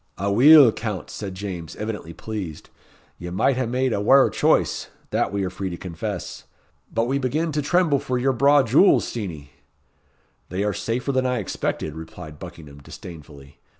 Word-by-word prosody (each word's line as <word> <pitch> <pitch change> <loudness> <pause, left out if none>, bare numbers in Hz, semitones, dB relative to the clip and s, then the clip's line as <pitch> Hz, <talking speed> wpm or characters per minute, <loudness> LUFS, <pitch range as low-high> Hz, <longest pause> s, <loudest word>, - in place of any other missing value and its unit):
"Aweel, 120 - +7
Count," 105 -4 -5
said 100 -3 -6
James, 95 -5 -6
evidently 105 -6 -5
pleased, 95 -5 -7 0.5
"ye 85 - -6
might 95 +9 +1
hae 130 -1 -1
made 125 +1 0
a 100 - -1
waur 135 +6 +5
choice - - +1 0.2
that - - 0
we 100 -1 -1
are 95 - -1
free 95 0 -4
to 85 - -6
confess. 90 +2 -6 0.5
We 125 +4 +1
begin 155 +5 -1
to 150 0 -1
tremble 155 -1 +2
for 130 -2 -2
your 130 +2 +1
braw 140 +3 +5
jewels, 135 - +4
Steenie." 80 -11 -6 1.0
"They 95 +3 -2
are 105 0 0
safer 125 +4 -2
than 130 -1 +1
I 125 0 0
expected," 90 -6 -3
replied 75 -1 -10
Buckingham, 75 -3 -11
disdainfully. 70 -2 -12
105 Hz, 160 wpm, -23 LUFS, 90-130 Hz, 1.0 s, Aweel